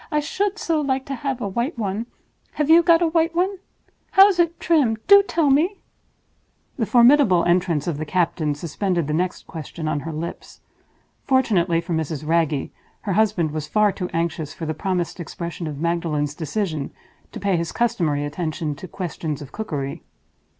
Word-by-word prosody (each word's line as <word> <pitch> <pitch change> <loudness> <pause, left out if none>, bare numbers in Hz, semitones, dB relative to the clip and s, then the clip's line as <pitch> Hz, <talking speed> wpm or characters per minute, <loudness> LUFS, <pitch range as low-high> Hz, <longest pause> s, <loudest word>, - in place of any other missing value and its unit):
I 300 - +2
should 395 +7 -1
so 325 -6 0
like 265 -2 -1
to 275 - -4
have 265 -1 -3
a 205 - -1
white 235 - -2
one. 215 +1 -3 0.5
Have 300 +1 +1
you 335 +1 +8
got 335 0 +4
a - - +3
white 330 0 +1
one? 375 +2 0 0.5
How 390 +1 +9
is 370 -3 -1
it 335 0 +2
trimmed? 285 -10 +2
Do 400 0 +8
tell 330 -7 +1
me!" 330 +9 +3 1.0
The 225 -5 -1
formidable 240 - +5
entrance 175 -4 +1
of 160 -4 -2
the 155 - -3
captain 160 -3 0
suspended 170 +2 -2
the 150 - -2
next 180 +3 -2
question 160 0 -7
on 155 -1 0
her 165 +3 -6
lips. 160 +2 -7 0.6
Fortunately 190 -11 +2
for 170 0 -4
Mrs. 155 -2 -3
Wragge, 160 -4 +1 0.3
her 200 - -2
husband 185 -6 +2
was 155 -1 -4
far 210 +2 +3
too 180 -2 -5
anxious 165 -3 -2
for 165 - -5
the 155 - -2
promised 180 0 -2
expression 170 0 -6
of 150 -2 -5
Magdalen's 165 -3 -1
decision 160 -2 -3 0.4
to - - -7
pay 195 -1 +1
his 170 -1 -2
customary 170 -12 0
attention 155 0 -3
to 185 - -8
questions 160 -4 -4
of 140 -2 -10
cookery. 145 -11 -4
180 Hz, 180 wpm, -22 LUFS, 160-265 Hz, 1.0 s, How